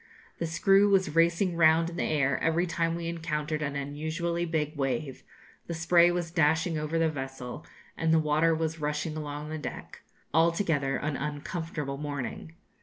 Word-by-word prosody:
The 170 - -1
screw 195 +5 +4
was 190 -6 +2
racing 170 +2 +3
round 165 0 +4
in - - -8
the - - -1
air 140 -3 +1
every 165 +2 +2
time 165 -1 -1
we 170 0 -4
encountered 155 -2 -2
an 145 -1 -2
unusually 160 +5 -2
big 155 -2 -1
wave; 135 -1 -2 0.5
the 170 - -3
spray 170 +1 +5
was 175 -1 -2
dashing 160 +1 +2
over 155 +1 -2
the 165 0 +3
vessel, 135 -4 -6 0.3
and 165 0 0
the 160 - +5
water 155 +1 +3
was 160 0 -2
rushing 150 +1 -2
along 150 0 -5
the 155 0 -4
deck - - -7 0.3
altogether 160 -4 +2
an 150 -2 -2
uncomfortable 150 -1 -4
morning. 145 +2 -5
160 Hz, 165 wpm, -28 LUFS, 150-170 Hz, 0.5 s, spray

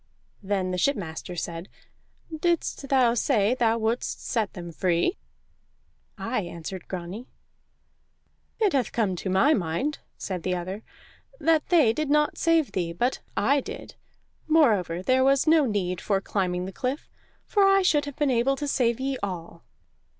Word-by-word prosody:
Then 190 -2 -1
the 180 - -2
shipmaster 180 - -2
said: 170 +1 -5 0.7
"Didst 320 -4 -1
thou 255 -4 +4
say 230 -3 +2
thou 230 -3 +2
wouldst 225 +2 -2
set 220 -5 -1
them 175 -2 -7
free?" 170 - 0 1.0
"Aye," 215 +4 -2
answered 175 +1 -7
Grani. 185 +6 -6 1.3
"It 420 -5 +2
hath 265 -4 0
come 210 -6 0
to 190 - -4
my 190 +12 +4
mind," 200 - -1 0.2
said 185 -3 -4
the 180 +2 -1
other, 185 +4 -5 0.6
"that 320 -2 +2
they 305 -11 +4
did 305 +3 -2
not 300 0 +2
save 330 -3 +2
thee, 170 -3 -2
but 245 +10 0 0.2
I 275 +7 +3
did. 470 - -8 0.5
Moreover, 210 - +3
there 260 +4 +3
was 275 0 +3
no 315 -2 +5
need 185 -5 -2
for 200 -2 +1
climbing 180 -2 -2
the 190 - -7
cliff, 260 +7 -3 0.4
for 410 - +2
I 390 0 +5
should 295 -5 +3
have 285 -2 -7
been 290 -3 +1
able 250 +3 +2
to 290 +1 -4
save 240 -3 +1
ye 270 0 -2
all." 170 -4 -6
230 Hz, 155 wpm, -26 LUFS, 185-280 Hz, 1.3 s, no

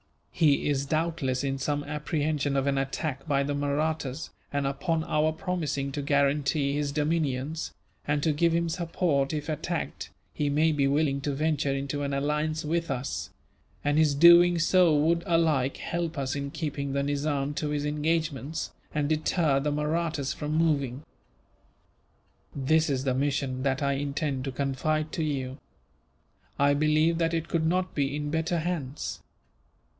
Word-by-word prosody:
He 150 -4 +3
is 140 -1 0
doubtless 155 -4 0
in 135 -1 -1
some 145 +2 -1
apprehension 150 -1 -1
of 135 - +1
an 140 -1 +1
attack 135 +1 -3
by 140 -2 +2
the 145 +1 -2
Mahrattas 145 0 -2 0.2
and, 145 -1 -1
upon 160 +4 -1
our 155 0 +1
promising 155 -5 -2
to 145 - -3
guarantee 140 0 +1
his 145 0 -1
dominions, 150 -1 -1 0.3
and 145 0 +1
to 155 - +2
give 170 +3 +2
him 170 +1 +1
support 165 -4 0
if 150 -1 -3
attacked, 155 -2 -3 0.2
he 145 -1 0
may 155 +3 +3
be 140 -2 +2
willing 140 -1 +1
to 145 0 -1
venture 150 -1 0
into 140 +1 -2
an 140 0 -2
alliance 150 +2 -1
with 165 +2 -1
us; 135 -1 -3 0.5
and 145 +1 +2
his 150 -3 +3
doing 170 +3 +7
so 170 -1 +4
would, 165 +3 +2
alike, 155 -6 +2
help 170 -2 -3
us 135 -1 -1
in 140 0 -3
keeping 140 -2 -3
the 140 0 0
Nizam 145 0 -1
to 150 - -1
his 145 0 -1
engagements, 150 -1 -1 0.2
and 150 -1 +1
deter 155 -1 +2
the 150 +2 -1
Mahrattas 150 -1 -1
from 150 0 -4
moving. 145 -5 +1 1.5
"This 155 +3 +2
is 135 -2 0
the 130 -2 +1
mission 135 -1 -1
that 135 +1 0
I 140 0 +2
intend 140 -1 -2
to 135 - -2
confide 150 +4 -1
to 160 - -2
you. 135 -2 -3 1.0
I 140 0 +4
believe 155 +3 +2
that 165 0 +1
it 165 0 -2
could 160 -2 0
not 180 +2 0
be 140 -1 0
in 145 0 -3
better 160 +2 0
hands. 155 -5 -3
150 Hz, 160 wpm, -28 LUFS, 140-160 Hz, 1.5 s, doing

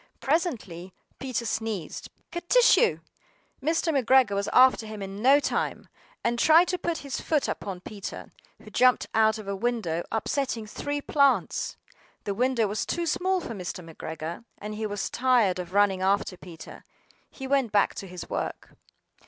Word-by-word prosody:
Presently 225 - -2 0.3
Peter 255 -3 -3
sneezed 220 -6 -4 0.2
"Kertyschoo!" 470 +6 +4 0.6
Mr. 325 +2 +1
McGregor 260 -4 +4
was 200 0 -1
after 255 -3 +5
him 215 -1 -7
in 195 +1 -6
no 270 +4 +6
time, - - -2 0.4
AND 235 0 0
tried 325 +6 +6
to 365 0 -1
put 340 -1 -2
his 275 - -4
foot 305 -3 0
upon 190 -3 -5
Peter, 205 0 -8 0.3
who - - -14
jumped 255 0 +4
out 220 0 +3
of 215 -2 -9
a 200 - -2
window, 195 -7 -1
upsetting 230 0 -1
three 290 +7 -4
plants. 280 -1 +1 0.5
The 200 - -2
window 245 +1 +1
was 210 +1 -2
too 345 - -2
small 370 +3 0
for 230 - -6
Mr. 180 -3 -6
McGregor, 160 +3 -6
and 210 +1 -6
he 215 0 -3
was 205 -1 -3
tired 240 -8 +2
of 180 -1 -6
running 200 -1 +3
after 195 0 +1
Peter. 175 -2 -12 0.5
He 265 - -9
went 265 -4 +1
back 205 -1 +3
to 195 - -7
his 180 -1 -8
work. - - -5
225 Hz, 160 wpm, -27 LUFS, 195-275 Hz, 0.6 s, no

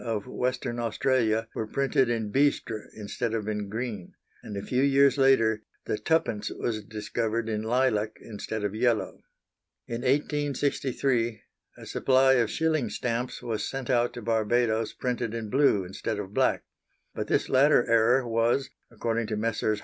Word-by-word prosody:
of 110 -4 -2
Western 125 -1 -2
Australia 115 -1 +1
were 110 - -3
printed 135 0 +1
in 110 -3 -1
bistre 135 -5 0
instead 110 +2 -3
of 110 -2 -3
in 105 -2 -3
green, 110 -4 -5 0.3
and 105 - -7
a 100 - -4
few 125 +4 0
years 140 0 +4
later 115 -6 +3 0.2
the - - -1
twopence 110 -3 0
was 110 -3 -3
discovered 110 +2 -2
in 105 -1 -1
lilac 110 -2 +1
instead 110 0 -6
of 105 -1 -1
yellow. 115 0 0 0.7
In 120 0 -4
1863 135 -4 0 0.3
a - - -11
supply 130 0 +3
of 120 -4 +2
shilling 155 -7 0
stamps 120 +4 -3
was 115 -3 -2
sent 135 -2 -3
out 120 -1 +2
to 120 - -8
Barbados 115 0 +1
printed 120 -3 -2
in 110 -2 -5
blue 130 -8 +3
instead 100 +4 -4
of 100 -1 -6
black; - - +2 0.5
but - - -4
this - - +1
latter 135 0 +4
error 120 +2 +3
was, 115 +4 +1 0.2
according 115 0 -2
to 110 - -2
Messrs. 110 -1 0
115 Hz, 155 wpm, -27 LUFS, 110-130 Hz, 0.7 s, years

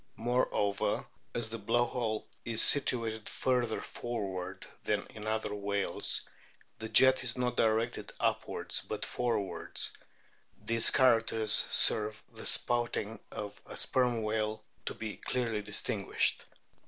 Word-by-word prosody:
Moreover, 115 -4 0 0.3
as 120 -2 -1
the 115 +1 -6
blow 115 +4 +1
hole 115 -3 -3 0.2
is 115 -1 +3
situated 115 -6 +3
further 125 -3 -1
forwards 95 -6 -5 0.2
than - - -1
in 110 0 -9
other 110 -1 -2
whales 100 -1 0 0.5
the 110 - -6
jet 130 +4 +6
is - - -2
not 125 -1 -1
directed 115 +1 0
upwards - - -1
but - - -4
forwards; 115 -5 -1 0.7
these 115 0 +3
characters 115 -4 +3 0.2
serve 105 0 +4
the - - -5
spouting 120 -2 +1
of 105 -1 -8
the - - -9
Sperm 125 -3 0
whale 110 0 -2 0.2
to - - -3
be 110 -2 -6
clearly 115 -4 -2
distinguished. 105 0 -1
110 Hz, 120 wpm, -31 LUFS, 105-120 Hz, 0.7 s, jet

